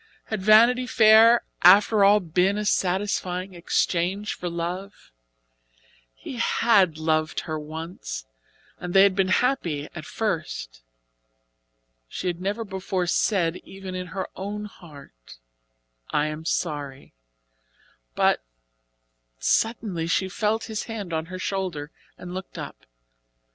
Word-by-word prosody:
Had 220 -3 -4
Vanity 235 +5 +5
Fair 225 +1 +6 0.2
after 200 +3 +6
all 205 +1 +6
been 180 +3 +1
a 210 - -2
satisfying 185 -1 -1
exchange 180 +3 -1
for 175 - -5
love? 175 +4 -6 1.0
He 250 - -8
had 200 -7 +3
loved 155 0 0
her 155 -1 -4
once, 155 - -7 0.5
and 180 0 -6
they 195 - +8
had 200 -2 +4
been 195 -1 +2
happy 185 - 0
at 155 - -8
first. - - -4 1.3
She 180 - -7
had 175 -1 -2
never 205 +4 -2
before 190 -2 -3
said, 175 -1 +1
even 190 -1 -9
in 180 0 -5
her 190 +2 -4
own 205 +2 -5
heart: 140 - -14 0.7
"I 150 - +1
am 155 +1 -5
sorry," 145 -5 -3 1.0
but - - +2 0.9
suddenly, 205 - 0
she 190 +3 0
felt 215 +3 -1
his 220 -1 -4
hand 210 -7 -6
on 160 0 -2
her 185 +1 -7
shoulder, 185 -6 -3 0.3
and 180 0 -8
looked 190 +1 -7
up. - - -9
185 Hz, 120 wpm, -25 LUFS, 165-205 Hz, 1.3 s, they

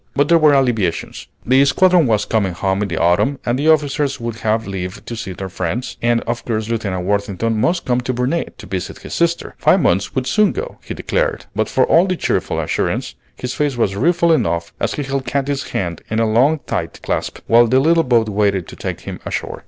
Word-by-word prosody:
But 145 +1 +2
there 170 -1 +6
were 150 -2 +5
alleviations. 115 -10 0 0.2
The 130 +3 +5
squadron 175 +2 +4
was 105 -2 +1
coming 100 -5 0
home 95 +2 -1
in 105 - 0
the 85 -4 -4
autumn, 90 - +2
and 120 +2 0
the 155 +3 +2
officers 145 -2 +1
would 115 -1 -4
have 110 0 0
leave 95 -1 -6
to 120 - -5
see 110 -4 -5
their 95 +1 -6
friends, 95 +6 -4
and 120 0 +2
of 120 0 -4
course 110 -1 -2
Lieutenant 100 -6 -2
Worthington 100 +2 -1
must 170 +6 +1
come 125 0 +1
to 130 - -2
Burnet 125 +7 -2
to - - -11
visit 95 0 -5
his - - -8
sister. 170 0 0
Five - - +4
months 95 +2 +1
would 130 -1 0
soon 210 +8 +2
go, 475 +5 -6
he - - -6
declared; - - -1
but - - 0
for - - +3
all 175 +3 +4
the 185 - 0
cheerful - - -1
assurance, - - -1 0.2
his 125 0 -5
face 145 -3 -1
was 100 -4 +1
rueful 170 - +2
enough 85 - 0
as - - -1
he 145 - -3
held 135 -1 -3
Katy's 140 0 -2
hand 85 -3 -3
in 110 - -1
a 115 - +3
long 135 +8 +3
tight - - -3
clasp - - -2
while 120 +1 +5
the 130 +3 +3
little 165 +4 +4
boat 120 -4 +2
waited 100 -4 0
to - - -10
take - - -5
him - - -7
ashore. - - -4
120 Hz, 220 wpm, -18 LUFS, 100-145 Hz, 0.2 s, there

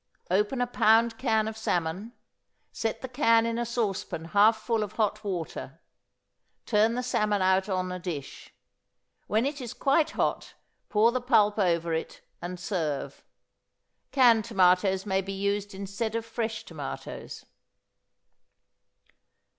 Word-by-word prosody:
Open 210 +7 +1
a - - +3
pound 225 -1 +3
can 220 -4 +1
of 220 - -4
salmon; 185 +1 -2 0.6
set 225 +2 -3
the - - -3
can 230 -3 +3
in 230 0 -1
a 240 - -1
saucepan 210 -8 -2
half 205 +5 +4
full 225 0 -1
of 210 0 -4
hot 215 -1 -1
water, 165 -5 -5 0.9
turn 220 +1 +3
the 250 - -2
salmon 210 -4 +1
out 190 +2 +2
on 185 -1 -1
a 180 - -4
dish. 165 -6 -7 0.8
When 220 +4 +1
it 285 0 -3
is 245 -1 -6
quite 300 +3 +2
hot, - - -1 0.3
pour 220 +2 +4
the 255 +1 -1
pulp 215 -4 +3
over 170 -3 +1
it, 160 - -4 0.2
and 175 +1 -6
serve. 165 -7 -3 0.9
Canned 235 -5 +5
tomatoes 190 -2 +3
may 190 -1 +1
be 195 +1 -6
used 200 0 -2
instead 200 +3 -4
of 230 0 -2
fresh 225 -1 -3
tomatoes. - - -7
210 Hz, 140 wpm, -27 LUFS, 190-230 Hz, 0.9 s, Canned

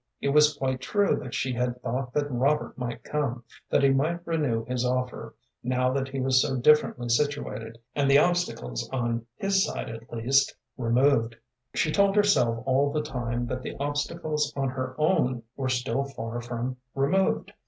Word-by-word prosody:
It 140 - -1
was 150 +1 +5
quite 130 -2 -1
true 205 +8 +2
that 130 -4 -6
she 130 - -1
had 125 0 -1
thought 125 +1 -2
that 145 -1 0
Robert 135 +5 +1
might 120 -2 -5
come, 135 -5 -2 0.3
that - - +3
he 140 - +6
might 160 +6 0
renew 145 -9 0
his 125 -1 -2
offer, 125 0 -2 0.3
now 125 +1 +1
that 135 0 -1
he 135 0 -5
was 130 0 +4
so 135 - 0
differently 125 -2 +3
situated, 120 -3 -1 0.2
and 140 -1 +1
the 140 - +7
obstacles, 150 - 0
on 120 -2 -2
his 195 -1 +2
side, - - -3
at 115 +1 -10
least, 130 +4 +2 0.2
removed. 120 -1 +2 0.4
She 155 - +1
told 200 +3 +3
herself 125 - +3
all 135 +2 +2
the 150 +1 -1
time 120 -4 -3
that 125 +1 -4
the - - -6
obstacles 150 +1 -1
on 135 -1 0
her 130 0 -4
own 130 -7 +1
were 130 -1 -2
still 130 +2 0
far 120 -3 -5
from 120 +1 -4 0.2
removed. 165 +8 +1
130 Hz, 175 wpm, -27 LUFS, 120-145 Hz, 0.4 s, the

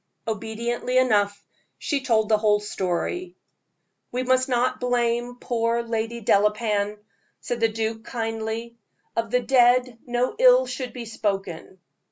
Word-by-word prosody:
Obediently 230 +3 -2
enough, 205 -5 +2 0.3
she 285 -3 -1
told 225 -4 +2
the 215 -1 +3
whole 210 -1 +3
story. 210 - -3 0.8
"We 250 +1 -1
must 255 +1 +2
not 255 +1 +1
blame 245 -1 0
poor 235 0 0
Lady 230 0 -3
Delapain," 210 0 +2 0.4
said 240 - -4
the 225 - +4
duke, 220 0 -3
kindly; 225 0 -4 0.4
"of 230 -1 -1
the 250 +2 +2
dead 250 -1 +3
no 245 - 0
ill - - +6
should 255 - -5
be 240 -1 -7
spoken. 195 -5 -3
230 Hz, 130 wpm, -24 LUFS, 220-250 Hz, 0.8 s, ill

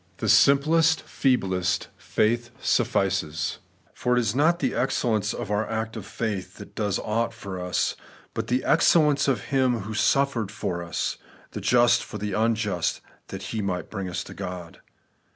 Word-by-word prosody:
The - - -2
sim 140 0 +7
plest, 160 +2 +2
feeblest 95 -9 0
faith 120 +2 0
snfl&ces; 85 -5 0 0.3
for 125 0 0
it - - +5
is 110 -4 0
not 160 +6 +3
the - - -1
excel 125 -2 0
lence 105 -3 +1
of - - -5
our 105 +1 0
act 110 0 -3
of 105 -3 -7
faith 105 -5 -4
that - - -11
does 105 -3 -1
aught 115 +2 -1
for 100 -5 -6
us, 90 0 0 0.4
but - - -3
the 125 +1 0
excellence 150 -3 +4
of 130 -6 +1
Him 130 -4 +2
who 105 +3 -6
suffered 120 -1 +1
for 100 -5 -3
sin, - - -2 0.3
the - - -6
just 120 -1 +4
for - - -7
the 105 -1 -3
unjust, 110 -4 0 0.3
that 95 0 -7
He 110 - -1
might 90 -3 -3
bring 100 -3 -4
us 85 - -3
to - - -10
God. 90 -2 -7
110 Hz, 170 wpm, -25 LUFS, 95-125 Hz, 0.4 s, sim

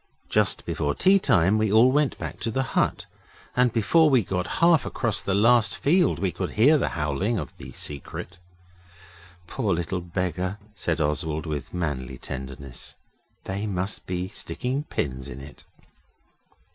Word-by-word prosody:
Just - - +2
before 75 -1 -1
tea 195 +1 +5
time 95 - +3
we 110 -2 +1
all 115 +4 +6
went 145 0 +1
back - - -6
to 115 - -2
the 130 +4 0
hut, - - +1 0.5
and 125 -1 +3
before 135 +9 +4
we 130 -5 +4
got 90 -1 -3
half 170 -2 +5
across 110 -5 0
the 100 - -1
last 115 +2 +4
field 170 +3 +3
we 95 +1 -1
could 95 0 -4
hear 140 +8 +5
the - - 0
howling 75 +10 0
of 75 - -5
the - - -10
Secret. 85 +4 -6 1.1
'Poor 105 -3 -1
little 85 +2 -2
beggar,' 90 +2 -2 0.2
said 85 -5 -2
Oswald, 80 +1 -1
with 75 -3 -4
manly 70 -7 -3
tenderness. 65 0 -7 0.5
'They 100 +3 -3
must 95 0 -3
be 90 0 -2
sticking 125 - -3
pins 65 - -3
in 70 -1 -8
it. 70 +1 -12
95 Hz, 155 wpm, -25 LUFS, 80-115 Hz, 1.1 s, all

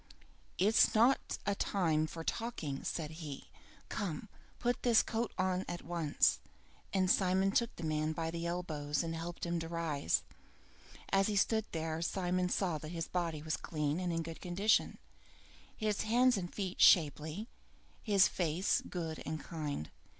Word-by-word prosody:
"It's 210 +4 +4
not 240 +5 +3
a 200 - +2
time 165 -6 +1
for 165 +1 -7
talking," 165 -11 -3
said 155 -2 -3
he. 145 -4 -7 0.4
"Come, 190 +1 -4 0.3
put 245 0 0
this 235 -3 +5
coat 230 0 -2
on 185 0 +1
at 175 - -5
once!" 165 -4 +2 0.5
And 190 -1 +2
Simon 190 +1 +3
took 235 +3 +1
the 170 - -8
man 155 0 0
by 160 +1 -2
the 170 0 -3
elbows 155 -4 -2
and 165 0 -3
helped 170 +2 -5
him 170 0 -1
to 165 - -4
rise. 160 - 0 0.9
As 195 0 +4
he 210 - -1
stood 220 +2 +2
there, 160 0 -2
Simon 180 0 0
saw 180 -5 0
that 155 - -7
his 165 -1 -4
body 165 -4 -2
was 155 0 -1
clean 150 0 -2
and 180 -1 -1
in 165 0 -1
good 165 0 -8
condition, 195 +5 +2 0.8
his 215 -2 0
hands 245 +3 +4
and 175 -3 -3
feet 190 -3 -3
shapely, 155 -2 +5
and 215 +2 -5 0.5
his 200 -4 +5
face 175 +2 +1
good 165 -3 -4
and 155 0 -4
kind. 150 - -5
175 Hz, 160 wpm, -34 LUFS, 160-195 Hz, 0.9 s, this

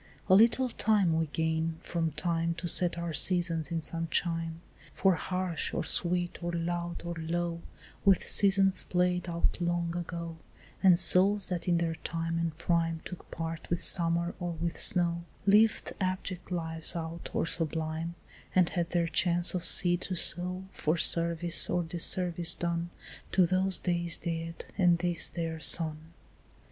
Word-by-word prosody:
A - - +6
little 230 +6 +5
time 205 -8 +1
we 160 0 0
gain 160 +1 -2
from 165 -2 -2
time 170 0 -1
To 175 +1 -5
set 175 0 +3
our 170 -1 -4
seasons 170 -2 +1
in 165 -1 -2
some 165 +1 -2
chime, 165 0 -1 0.3
For 190 -1 +3
harsh 180 0 -3
or - - -1
sweet 175 0 0
or 175 - -2
loud 170 0 -3
or 170 - -3
low, 170 +1 -3 0.4
With 195 -3 +4
seasons 195 -1 +3
played 180 0 0
out 170 +1 -1
long 170 0 -1
ago 170 -1 -5 0.4
And 180 -3 +5
souls 185 +4 +5
that 180 -1 -4
in 175 -1 +3
their 170 -1 -1
time 165 +1 -4
and 165 -2 -3
prime 165 -1 0
Took 180 - -9
part 165 0 -6
with 170 - 0
summer 170 0 +1
or 175 -1 -3
with 170 +1 -3
snow, 170 -1 +1 0.2
Lived 210 +2 +3
abject 185 -1 -3
lives 165 -2 -2
out 165 0 -6
or - - -1
sublime, 160 0 -2 0.4
And 185 -2 +4
had 170 -1 -2
their 170 -1 0
chance 175 +1 +2
of 180 -2 -2
seed 175 0 +3
to 185 - -3
sow 180 +2 +1
For 155 -2 -1
service 170 +1 +2
or 175 0 0
disservice 175 +1 +2
done 170 0 -2 0.4
To 185 - +5
those 185 +2 0
days 170 -1 -1
daed 165 -1 -5
and 175 -2 +4
this 175 -1 -2
their 165 -2 -4
son. 160 0 0
170 Hz, 155 wpm, -29 LUFS, 165-180 Hz, 0.4 s, A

